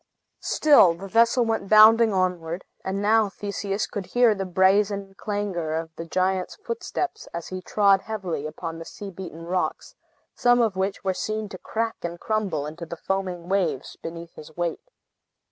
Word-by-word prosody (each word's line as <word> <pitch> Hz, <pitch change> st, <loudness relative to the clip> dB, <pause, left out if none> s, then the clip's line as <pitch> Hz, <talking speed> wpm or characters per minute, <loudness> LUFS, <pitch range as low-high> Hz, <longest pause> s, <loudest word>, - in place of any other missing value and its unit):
Still 280 Hz, -, +5 dB
the 195 Hz, +4 st, -8 dB
vessel 235 Hz, +4 st, +4 dB
went 225 Hz, -3 st, -2 dB
bounding 220 Hz, +1 st, +7 dB
onward; 180 Hz, -2 st, -1 dB, 0.2 s
and 195 Hz, +1 st, -2 dB
now 215 Hz, 0 st, +4 dB
Theseus 200 Hz, 0 st, -3 dB
could 195 Hz, -3 st, -6 dB
hear 245 Hz, -2 st, +4 dB
the 195 Hz, -2 st, -4 dB
brazen 195 Hz, +2 st, +2 dB
clangor 195 Hz, -7 st, -3 dB
of 160 Hz, 0 st, -5 dB
the 165 Hz, -, -6 dB
giant's 185 Hz, +1 st, 0 dB
footsteps, 420 Hz, -4 st, -4 dB
as 170 Hz, -, -5 dB
he 185 Hz, 0 st, -5 dB
trod 200 Hz, 0 st, +3 dB
heavily 185 Hz, -9 st, -4 dB
upon 165 Hz, +1 st, -6 dB
the 165 Hz, -, -8 dB
sea 200 Hz, +3 st, -8 dB
beaten 165 Hz, -3 st, -8 dB
rocks, 180 Hz, +1 st, -2 dB, 0.4 s
some 245 Hz, 0 st, +3 dB
of 225 Hz, -5 st, +2 dB
which 190 Hz, +1 st, -2 dB
were 190 Hz, -1 st, +1 dB
seen 215 Hz, +2 st, -3 dB
to 185 Hz, -, -9 dB
crack 225 Hz, 0 st, -2 dB
and 170 Hz, 0 st, -5 dB
crumble 200 Hz, -9 st, -1 dB
into 160 Hz, +3 st, -7 dB
the 170 Hz, -, -7 dB
foaming 185 Hz, -2 st, -3 dB
waves 175 Hz, -8 st, -1 dB
beneath 170 Hz, 0 st, -8 dB
his 155 Hz, +1 st, -13 dB
weight. 175 Hz, -, -3 dB
190 Hz, 165 wpm, -25 LUFS, 170-215 Hz, 0.4 s, bounding